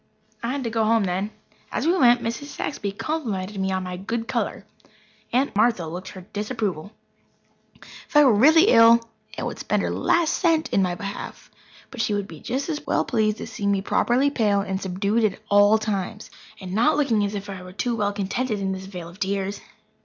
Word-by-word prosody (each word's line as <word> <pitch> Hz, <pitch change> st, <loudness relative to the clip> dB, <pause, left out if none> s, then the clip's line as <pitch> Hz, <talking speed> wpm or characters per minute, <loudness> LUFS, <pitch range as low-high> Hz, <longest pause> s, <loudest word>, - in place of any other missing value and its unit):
I 235 Hz, -, -3 dB
had 280 Hz, -1 st, -3 dB
to 230 Hz, -, -3 dB
go 225 Hz, -1 st, +1 dB
home 225 Hz, 0 st, +3 dB
then. 190 Hz, +2 st, -1 dB, 0.4 s
As 255 Hz, -, -2 dB
we 340 Hz, +3 st, +3 dB
went 245 Hz, -6 st, +5 dB
Mrs. 230 Hz, +5 st, -3 dB
Saxby 245 Hz, -7 st, -4 dB
complimented 205 Hz, -7 st, -3 dB
me 190 Hz, 0 st, 0 dB
on 190 Hz, 0 st, -1 dB
my 180 Hz, 0 st, -5 dB
good 225 Hz, +5 st, -4 dB
colour. -, -, -2 dB, 0.7 s
Aunt 260 Hz, 0 st, +1 dB
Martha 215 Hz, -4 st, +2 dB
looked 175 Hz, +4 st, -7 dB
her 185 Hz, -, -10 dB
disapproval. 210 Hz, -5 st, -3 dB, 1.2 s
If -, -, -16 dB
I 295 Hz, -, +8 dB
were 255 Hz, -, +6 dB
really 315 Hz, -, +6 dB
ill 230 Hz, 0 st, +7 dB, 0.4 s
Aunt -, -, -3 dB
would -, -, -5 dB
spend -, -, 0 dB
her -, -, -1 dB
last 335 Hz, -2 st, +2 dB
cent 325 Hz, -3 st, +1 dB
in 195 Hz, -, +2 dB
my 180 Hz, -2 st, 0 dB
behalf, 200 Hz, +2 st, -7 dB, 0.4 s
but 245 Hz, -, -4 dB
she 210 Hz, -2 st, 0 dB
would 205 Hz, -1 st, -2 dB
be 160 Hz, -5 st, -11 dB
just 270 Hz, +3 st, -3 dB
as 305 Hz, -3 st, -3 dB
well -, -, +1 dB
pleased 215 Hz, -3 st, +1 dB
to -, -, -6 dB
see 215 Hz, -2 st, -4 dB
me 200 Hz, -1 st, +1 dB
properly 260 Hz, +7 st, +2 dB
pale 210 Hz, -6 st, +2 dB
and 190 Hz, -1 st, -3 dB
subdued 200 Hz, +5 st, 0 dB
at 210 Hz, -3 st, 0 dB
all 205 Hz, +1 st, +6 dB
times, 210 Hz, 0 st, -4 dB, 0.3 s
and 185 Hz, -1 st, -7 dB
not 265 Hz, +9 st, +3 dB
looking 240 Hz, -8 st, +2 dB
as 205 Hz, +1 st, -2 dB
if 200 Hz, 0 st, -5 dB
I 195 Hz, -2 st, -7 dB
were 180 Hz, 0 st, -10 dB
too 235 Hz, +5 st, -2 dB
well 205 Hz, -2 st, 0 dB
contented 205 Hz, +3 st, -2 dB
in 195 Hz, -1 st, -1 dB
this 190 Hz, 0 st, -5 dB
vale 180 Hz, -4 st, -7 dB
of 175 Hz, +3 st, -15 dB
tears. 195 Hz, 0 st, -2 dB
210 Hz, 205 wpm, -24 LUFS, 195-240 Hz, 1.2 s, I